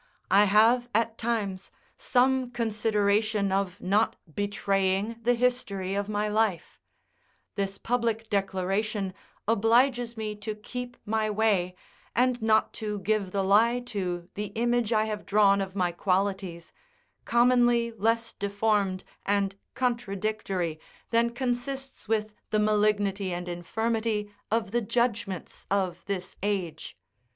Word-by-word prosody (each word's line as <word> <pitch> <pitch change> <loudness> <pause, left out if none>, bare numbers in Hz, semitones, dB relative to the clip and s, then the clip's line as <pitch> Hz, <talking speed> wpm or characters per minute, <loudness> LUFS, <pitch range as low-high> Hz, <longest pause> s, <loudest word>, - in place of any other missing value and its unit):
I 200 +2 +7
have, 225 +5 +4
at 230 0 +1
times, 205 -5 -2 0.3
some 255 0 +2
consideration 215 -3 +1
of 195 -1 -1
not 205 +4 +2 0.2
betraying 200 +2 0
the 245 +2 +3
history 230 -6 0
of 200 +1 -2
my 210 0 0
life: 210 -4 0 0.7
this 195 -1 -2
public 230 -2 -1
declaration 195 0 -1 0.3
obliges 235 +2 +3
me 215 -1 -3
to 210 +1 -5
keep 245 +3 -7
my 220 0 0
way, 205 -4 +1 0.4
and 250 0 +2
not 220 0 +3
to 210 -1 -2
give 205 -1 0
the 195 0 0
lie 225 +5 +4
to 185 -8 -4
the 210 +1 -3
image 240 0 +1
I 215 -1 +3
have 210 -1 -4
drawn 200 -1 +4
of 190 0 -5
my 180 -3 +1
qualities, 185 -1 -1 0.5
commonly 240 -1 +3
less 230 +1 0
deformed 200 -2 0 0.2
and 200 -1 +1 0.2
contradictory 215 -8 -1 0.3
than 230 0 +3
consists 260 +2 -3
with 215 -1 0 0.2
the 215 - +1
malignity 210 -2 +2
and 175 0 -4
infirmity 215 +4 -2 0.2
of 220 -2 0
the 240 +1 +1
judgments 225 -5 -2
of 185 -3 0
this 190 -2 -4
age. 180 - -3
210 Hz, 125 wpm, -28 LUFS, 195-230 Hz, 0.7 s, I